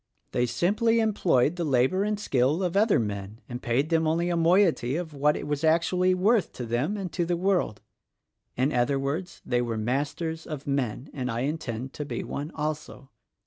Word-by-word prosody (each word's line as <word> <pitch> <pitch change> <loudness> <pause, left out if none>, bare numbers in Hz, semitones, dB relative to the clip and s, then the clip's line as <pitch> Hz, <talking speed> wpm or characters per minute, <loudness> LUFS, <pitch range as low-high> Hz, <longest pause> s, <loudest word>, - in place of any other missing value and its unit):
They 120 0 +1
simply 210 - +2
employed 180 - +2
the 175 - -1
labor 140 +6 +2
and 210 0 -1
skill 145 0 +1
of 180 0 -1
other 210 +1 +4
men 105 -1 -4
and 120 0 -6
paid 130 +6 0
them 160 -1 +3
only 170 +2 +1
a - - +1
moiety 165 -6 +3
of 165 -2 -4
what 150 +1 +2
it - - -5
was 145 +1 -2
actually 180 +3 +3
worth 205 +3 +2
to 125 - -5
them 125 - -1
and 190 -3 -4
to 175 - 0
the 170 0 0
world. 180 - 0 0.8
In 130 +4 +1
other 125 +3 +2
words, 155 +7 -4
they 120 -1 +1
were 115 -2 -2
'Masters 145 +8 -2
of 150 -3 -6
Men,' 135 -2 -2
and 125 -3 -3
I 115 0 -2
intend 135 -4 -3
to 150 - -4
be 145 - -4
one 145 +3 -5
also. 150 -3 -5
150 Hz, 190 wpm, -27 LUFS, 125-175 Hz, 0.8 s, other